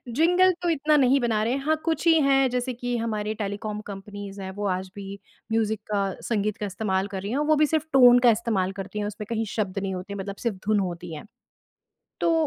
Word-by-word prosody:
Jingle 360 +4 +5
तो 350 - 0
इतना 305 -1 +2
नहीं 270 0 +4
बना 225 -3 +1
रहे 235 +3 0
हैं, 275 - -1
हाँ, 315 0 +3
कुछ 320 0 0
ही 330 - +7
हैं 270 -1 +4
जैसे 250 +1 -2
कि 245 0 -3
हमारे 215 -2 -2
टेलीकॉम 210 0 -4
कंपनीज़ 200 0 -8
हैं 190 0 -5
वो 205 - -2
आज 185 0 -2
भी 200 0 -7 0.3
म्यूजिक 220 -1 +1
का, 195 -2 0
संगीत 210 +2 -1
का 210 - -3
इस्तेमाल 190 0 -1
कर 195 -2 -5
रही 200 +3 -4
हैं 265 - 0
वो - - +6
भी 305 +1 +4
सिर्फ़ 315 0 0
टोन 245 -2 +8
का - - +8
इस्तेमाल 210 -4 0
करती 200 +2 -5
हैं, 205 - -1
उसमें 210 0 -5
कहीं 225 -1 -1
शब्द 195 -3 -1
नहीं 190 -1 -3
होते 195 +2 -6
मतलब 200 0 -5
सिर्फ़ 210 -5 0
धुन 215 -1 +3
होती 175 -2 -4
हैं। 150 - -8 1.0
तो 335 - +3
215 Hz, 225 wpm, -25 LUFS, 195-250 Hz, 1.0 s, टोन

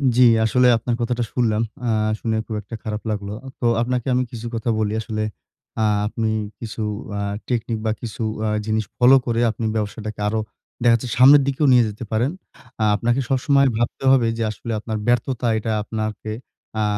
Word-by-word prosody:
জ্বি, 125 - +6 0.2
আসলে 125 +3 +4
আপনার 120 +1 -2
কথাটা 120 0 0
শুনলাম। 110 -3 +1 0.3
আ - - +1 0.3
শুনে 110 -1 -1
খুব 110 - -5
একটা 105 +3 -8
খারাপ 105 0 -4
লাগলো। 100 -1 -4 0.3
তো - - -2 0.2
আপনাকে 125 0 -1
আমি 125 +1 +2
কিছু 120 0 -6
কথা 115 +1 -2
বলি, 105 -1 0
আসলে 110 0 -3 0.6
আ - - +3 0.2
আপনি 110 +1 -1 0.3
কিছু 115 -1 -6 0.4
আ - - -2 0.3
টেকনিক 115 -2 -1
বা 110 - +2
কিছু 115 -1 -6 0.2
আ - - +1 0.2
জিনিস 110 0 0
ফলো 125 +2 +7
করে 115 -1 0
আপনি 115 - -5
ব্যবসাটাকে 110 0 -4
আরো 110 +1 0 0.4
দেখা 120 -1 +6
যাচ্ছে 120 +2 -3
সামনের 140 +3 +8
দিকেও 140 +2 +1
নিয়ে 125 -1 +6
যেতে 105 +3 -8
পারেন। 120 +6 +1 0.5
আ - - +3
আপনাকে 120 +4 +1
সবসময় 140 +1 +3
ভাবতে 120 +3 -2
হবে 130 -4 +4
যে 115 - -1
আসলে 115 +2 -7
আপনার 110 0 -4
ব্যর্থতা 120 +1 +1
এটা 110 +1 -2
আপনাকে 110 -1 -4 0.5
আ - - +2
115 Hz, 180 wpm, -22 LUFS, 110-125 Hz, 0.6 s, সামনের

